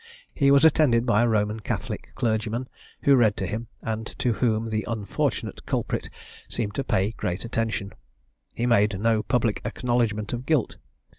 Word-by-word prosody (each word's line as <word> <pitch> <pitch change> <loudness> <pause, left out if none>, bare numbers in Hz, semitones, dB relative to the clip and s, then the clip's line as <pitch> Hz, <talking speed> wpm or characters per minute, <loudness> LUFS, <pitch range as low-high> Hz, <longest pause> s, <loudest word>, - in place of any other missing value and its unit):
He 140 -2 +3
was 140 +2 +6
attended 140 -7 +4
by 115 -3 +3
a 120 - +3
Roman 105 -1 +1
Catholic - - -4
clergyman, 115 +2 -1 0.4
who 140 - +6
read 110 -4 +3
to 95 - -2
him, 110 +5 -4 0.2
and 110 0 -3
to 120 - +1
whom 115 -1 0
the 110 -1 0
unfortunate 105 -4 -2
culprit - - -2 0.4
seemed 105 -4 -3
to 135 - -2
pay 95 -2 +1
great 90 -2 -3
attention; 115 -4 -2 0.6
he 120 - -2
made 105 -4 +3
no 110 0 +2
public 115 -2 0
acknowledgment 115 -4 -1
of 120 +2 -5
guilt. 155 -7 +1
115 Hz, 160 wpm, -25 LUFS, 105-120 Hz, 0.6 s, was